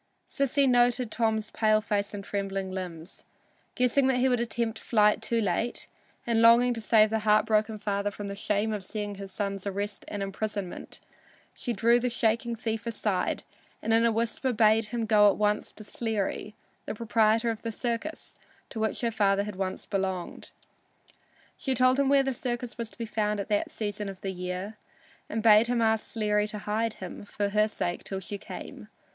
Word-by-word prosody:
Sissy 275 0 +2
noted 245 -1 +3
Tom's 220 -2 0
pale 215 -1 +3
face 205 -1 -1
and 205 -1 -6
trembling 195 -1 -3
limbs. 180 -2 -7 0.5
Guessing 250 +2 +3
that 265 -1 +2
he 255 +1 +3
would 250 -2 +2
attempt 230 -1 -2
flight 210 -2 +3
too 235 - 0
late, 220 +3 -1 0.4
and 230 -1 +2
longing 235 +2 +6
to 230 - -6
save 215 -1 +4
the 220 - +1
heartbroken 215 0 +2
father 205 -1 -1
from 205 0 -7
the 200 - -5
shame 210 +2 0
of 205 -2 -4
seeing 205 +1 -4
his 195 -1 -8
son's 200 -1 -3
arrest 200 +1 -3
and 205 -1 -4
imprisonment, 200 -1 -4 0.5
she 245 - -4
drew 235 +2 +4
the 250 +1 0
shaking 230 0 0
thief 225 0 -3
aside 210 -4 -1 0.4
and 225 - 0
in 225 +1 +4
a 235 - +4
whisper 230 +3 -1
bade 220 -1 +4
him 230 +1 -3
go 210 -1 +6
at 195 - 0
once 210 0 0
to 215 - -12
Sleary, 215 -1 -3 0.3
the - - -3
proprietor 225 +1 +2
of 225 - -6
the 230 - -3
circus 240 +7 -4 0.3
to 225 - -5
which 220 -1 -1
her 235 -1 0
father 200 -2 +2
had 210 -1 -6
once 190 0 -3
belonged. 190 -3 -3 1.1
She 265 -2 -1
told 255 +2 +4
him 275 -1 +3
where 280 -1 +5
the 270 0 -1
circus 240 -1 -4
was 230 -2 -5
to - - -19
be 230 - -3
found 210 -1 -1
at 200 - -4
that 205 -1 +1
season 205 -1 -4
of 190 -1 -9
the 195 - -3
year, 180 +3 -5 0.5
and 220 0 -2
bade 220 0 +7
him 245 0 +1
ask 220 -1 +2
Sleary 210 -2 0
to 210 - -6
hide 215 +2 -1
him 185 +1 -8
for 205 0 -2
her 210 +1 +3
sake 180 -4 -3
till 195 - -4
she 200 +2 -6
came. - - -9
215 Hz, 190 wpm, -28 LUFS, 205-230 Hz, 1.1 s, bade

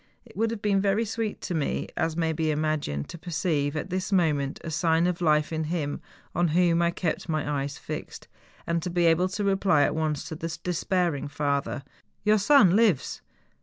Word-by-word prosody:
It - - -17
would 225 +1 +1
have 225 -2 -5
been 200 -2 +2
very 200 +3 +1
sweet 220 0 -3
to - - -4
me. 160 - 0
THE 145 - 0
GALENSTOCK. - - -4
93 - - +2
as 165 0 -4
may 165 -1 +1
be 160 0 -1
imagined, 150 - -1
to - - -7
perceive, 155 -4 -1
at 175 +5 -4
this 185 +2 -2
moment, 150 -7 +1
a 165 - -5
sign 165 +1 +2
of 180 -1 -1
life 155 -1 +2
in 160 0 -1
him 150 -3 -2 0.3
on 175 +1 +2
whom 170 +1 +3
I 170 - +3
kept 170 -1 -3
my 150 -2 -1
eyes 140 +1 -4
fixed, - - -7 0.4
and 170 0 0
to 180 - -3
be 175 0 +1
able 170 +3 +3
to 205 +2 -3
reply 195 -6 +3
at - - +1
once 155 -2 -1
to 160 - -5
the 165 +1 -5
despairing 175 -4 0
father, 140 -1 -2 0.2
' - - -45
Your 210 0 +4
son 205 -5 +6
lives! 210 - +2
165 Hz, 215 wpm, -26 LUFS, 150-185 Hz, 0.4 s, son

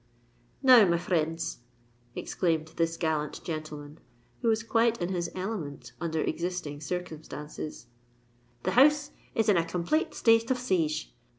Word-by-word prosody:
"Now, 255 -4 +9
my 170 -1 +3
frinds," 165 -1 -1 0.6
exclaimed 160 -3 -1
this 165 0 0
gallant 155 -2 -1
gentleman, 155 -2 -6 0.4
who - - 0
was 225 0 +2
quite 230 0 +2
in 175 0 -1
his 175 -2 -1
element 185 -7 -5
under 160 -2 -1
existing 170 -3 -3
circumstances, 155 -4 -6 0.8
"the - - 0
house 290 +3 +5 0.2
is 225 -1 +2
in 205 -4 +5
a 165 - +3
complate 175 - -1
state 225 0 +4
of 260 - +2
siege! 165 -11 -1
170 Hz, 130 wpm, -29 LUFS, 155-225 Hz, 0.8 s, Now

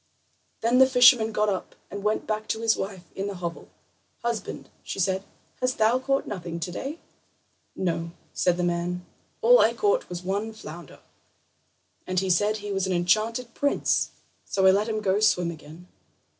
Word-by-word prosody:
Then 235 +3 +3
the 265 - +8
fisherman 245 -3 +6
got 210 0 +1
up 195 -3 -3 0.2
and 200 +1 -5
went 210 +1 0
back 215 0 -3
to 220 - -2
his 225 -1 +3
wife 190 -2 -5
in 195 +1 -3
the 200 - -4
hovel. 170 -2 -6 0.5
"Husband," 235 -4 -3
she - - -6
said, 190 0 0 0.4
"hast 255 0 0
thou 225 +3 +3
caught 275 +1 0
nothing 170 -3 -5
today?" 185 - -4 0.8
"No," 170 -2 -2 0.2
said 175 -1 +1
the 180 - -1
man; 175 +1 -1 0.4
"all - - +7
I - - +4
caught 435 +4 +1
was 180 0 -6
one 200 +4 -2
flounder, 170 -7 -11 1.1
and 185 0 +1
he 190 0 0
said 205 +5 +2
he 205 -1 -6
was 195 -1 0
an 190 - 0
enchanted 220 +7 +1
prince, 285 0 +1 0.3
so 190 -1 0
I 190 - +8
let 205 +4 +1
him 215 -1 -1
go 195 -1 +2
swim 180 -5 +3
again." 160 +2 -12
200 Hz, 170 wpm, -26 LUFS, 180-225 Hz, 1.1 s, the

